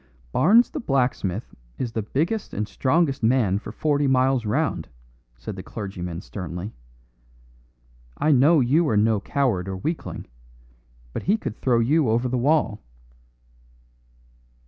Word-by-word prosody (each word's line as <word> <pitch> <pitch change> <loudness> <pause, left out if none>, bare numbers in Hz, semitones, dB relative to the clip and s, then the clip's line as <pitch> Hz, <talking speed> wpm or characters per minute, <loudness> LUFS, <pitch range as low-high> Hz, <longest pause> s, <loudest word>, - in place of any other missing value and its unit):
"Barnes 225 - +5
the - - -4
blacksmith 125 - -1 0.2
is 120 - -3
the 110 - -2
biggest 165 - -2
and 105 +1 -2
strongest 140 +2 +1
man 110 -5 +2
for 105 - -8
forty 145 +4 +1
miles 130 -3 +2
round," 105 - -1 0.5
said - - -7
the - - -6
clergyman 90 -4 -6
sternly. 90 +2 -6 1.4
"I 155 - +2
know 145 +3 +5
you 150 +7 +3
are 110 - +2
no 110 0 +3
coward 110 -6 0
or 95 - -4
weakling, 155 - -4 0.9
but - - -3
he 205 +5 +2
could 115 - -5
throw 125 -2 +1
you 135 +3 +2
over 120 +3 +1
the 125 0 -1
wall." 130 -5 +1
125 Hz, 135 wpm, -24 LUFS, 105-145 Hz, 1.4 s, Barnes